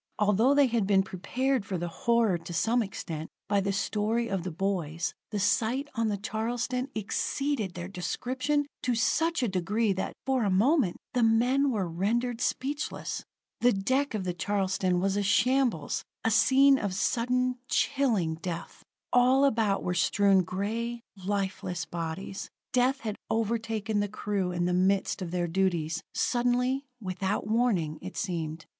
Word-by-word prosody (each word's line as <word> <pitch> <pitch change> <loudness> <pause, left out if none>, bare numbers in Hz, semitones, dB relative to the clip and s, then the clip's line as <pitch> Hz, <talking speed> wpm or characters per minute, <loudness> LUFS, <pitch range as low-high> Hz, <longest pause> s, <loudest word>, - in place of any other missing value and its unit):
Although 215 +6 +3
they 285 -1 +6
had 230 -5 0
been 195 -1 +4
prepared 245 +7 -1
for 190 -2 -3
the 175 +1 -3
horror 225 0 +1
to 175 - -8
some 230 +8 +2
extent 165 -6 -5 0.2
by 200 +1 +2
the 195 +1 0
story 215 +4 0
of 195 -2 -1
the 185 - -4
boys, 170 -3 -2 0.2
the 210 - -3
sight 235 +7 +1
on 230 -3 0
the 205 -1 0
Charleston 240 +5 -2
exceeded 220 0 -1
their 175 0 -5
description 255 +10 -1 0.2
to 250 -1 0
such 325 +6 +1
a - - +2
degree 200 +3 +1
that, 190 - -3
for 265 -1 +1
the 210 - +1
moment, 215 - +3 0.2
the 245 - +2
men 245 +5 +3
were 205 -7 0
rendered 230 +8 -1
speechless. 285 +4 -2 0.4
The 245 - +5
deck 260 +7 0
of 205 - -2
the 180 -1 -2
Charleston 190 -1 0
was 195 +1 +1
a - - +2
shambles 235 - +2 0.2
a 225 - +3
scene 270 +5 +5
of 200 -3 -2
sudden, 250 +4 +1
chilling 230 - +1
death. 170 -3 -6 0.3
All 255 +3 +5
about 220 -6 +1
were 180 - -1
strewn 195 +2 +4
gray, 225 +6 -3
lifeless 190 -3 -3
bodies. 170 +4 -5 0.2
Death 255 +2 +2
had 215 -2 -4
overtaken 220 -1 -1
the 205 - +1
crew 200 -3 -2
in 175 0 -1
the 180 - +1
midst 190 +2 +1
of 180 - -3
their 175 0 -1
duties, 170 -2 0
suddenly, 250 +2 +1
without 190 0 -2
warning, 215 -9 +1
it 185 +1 -8
seemed. 165 -4 -3
210 Hz, 155 wpm, -28 LUFS, 185-245 Hz, 0.4 s, they